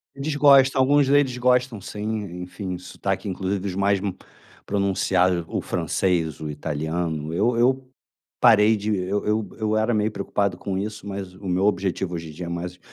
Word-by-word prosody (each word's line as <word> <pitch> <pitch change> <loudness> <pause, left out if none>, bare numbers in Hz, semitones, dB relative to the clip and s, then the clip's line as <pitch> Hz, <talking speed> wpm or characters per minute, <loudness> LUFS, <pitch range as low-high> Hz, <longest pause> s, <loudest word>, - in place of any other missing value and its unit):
Eles 140 +2 -3
gostam, 135 -2 +6
alguns 140 +1 +4
deles 135 -3 +3
gostam 125 -2 +2
sim, 105 +2 -7 0.4
enfim, 90 +1 -5
o - - -8
sotaque 90 - -4
inclusive 95 +1 -2
os 90 - -4
mais 100 0 +2 0.7
pronunciado 95 -3 +1
o - - -2
francês, 85 -5 -1
o 75 - -4
italiano, 80 +1 -3
eu 115 +7 +1
eu 130 +2 +2 0.5
parei 110 -1 +6
de 105 0 -1
eu 105 +3 -1
eu 110 -1 0
era 110 +2 +1
meio 105 0 +1
preocupado 100 -1 -1
com 95 -1 -3
isso 105 +1 -5
mas 95 -2 -6
o 95 +1 -9
meu 90 +2 +1
objetivo 95 -3 0
hoje 80 -1 -6
em - - -10
dia 85 +3 -6
é - - -5
mais 90 +1 -5
100 Hz, 170 wpm, -24 LUFS, 90-110 Hz, 0.7 s, gostam